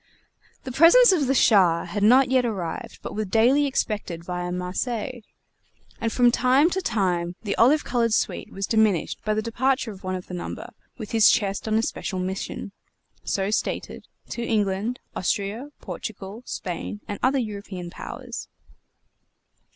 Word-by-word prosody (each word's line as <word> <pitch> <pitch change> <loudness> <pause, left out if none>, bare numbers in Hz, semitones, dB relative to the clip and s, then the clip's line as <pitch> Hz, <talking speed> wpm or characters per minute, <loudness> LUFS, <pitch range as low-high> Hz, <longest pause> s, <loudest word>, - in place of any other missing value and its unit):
The 260 - -6
presents 340 - +7
of 310 -8 +2
the 270 - +2
Shah 185 -9 +4
had 205 - -4
not 255 +5 +5
yet 260 -1 +4
arrived, 190 -8 -4
but - - -6
were 215 - -1
daily 240 +8 +3
expected 205 -10 -2
via 180 0 -4
Marseilles, 215 +7 -3 0.8
and 230 -1 -1
from 245 0 +4
time 260 +7 +3
to 380 - -1
time 180 - 0
the 205 -2 -2
olive 280 +7 +5
colored 235 -2 0
suite - - -1
was 195 0 -3
diminished 215 -6 +1
by 215 0 0
the 215 - -1
departure 255 +2 0
of 195 -1 -12
one 185 0 -2
of 180 - -6
the - - -10
number 175 - -6 0.3
with 220 -4 -7
his 225 -2 +6
chest 200 -3 0
on 215 - +1
a 225 - +2
special 195 - -3
mission 190 +2 -4 0.5
(so 195 +1 -1
stated) - - -3 0.2
to 235 - -4
England, 215 +1 0 0.2
Austria, 205 +8 -2
Portugal, 210 0 -7
Spain, 185 +3 -5
and 205 - -5
other 265 +2 +2
European 200 -6 -5
powers. - - -7
215 Hz, 160 wpm, -24 LUFS, 190-250 Hz, 0.8 s, presents